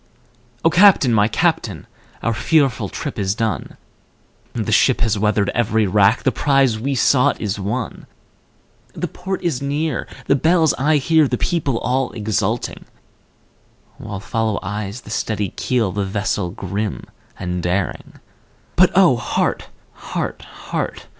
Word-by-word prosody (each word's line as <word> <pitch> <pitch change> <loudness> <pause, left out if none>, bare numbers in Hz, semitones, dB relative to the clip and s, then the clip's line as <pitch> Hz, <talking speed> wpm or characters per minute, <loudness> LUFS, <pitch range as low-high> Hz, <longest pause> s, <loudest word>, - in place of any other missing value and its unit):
O 165 - +5
Captain! 175 - +6
my 105 -1 +4
Captain! 110 - -1 0.4
our 115 - +1
fearful 130 - +1
trip 145 -7 -5
is 95 0 0
done, 115 -1 -3 0.8
The 110 -2 -2
ship 120 +4 +3
has 110 -3 +1
weathered 105 -1 +1
every 110 -2 +1
rack, 100 +3 +3
the 130 - +3
prize 135 -2 +2
we 135 +4 -1
sought 130 0 +3
is 105 -2 -3
won, 105 +4 -4 0.9
The - - -3
port 190 +1 -5
is 160 -8 -1
near, 145 0 -2 0.2
the 140 - +3
bells 160 +2 +3
I 150 +3 +3
hear, 155 +2 +3
the 125 - -1
people 145 -7 0
all 130 +2 -1
exulting, 110 +1 -2 1.1
While 105 -3 -6
follow 110 +1 -1
eyes 105 +4 -4
the 105 - -11
steady 105 -3 -1
keel, 115 -2 -1
the 100 +2 -2
vessel 100 -1 -1
grim 100 +2 -4 0.3
and 90 0 -3
daring; 90 +2 -3 0.6
But 185 +1 +6
O 175 -11 +6
heart! 120 - -1 0.3
heart! - - -5
heart! - - -5
115 Hz, 140 wpm, -20 LUFS, 105-140 Hz, 1.1 s, Captain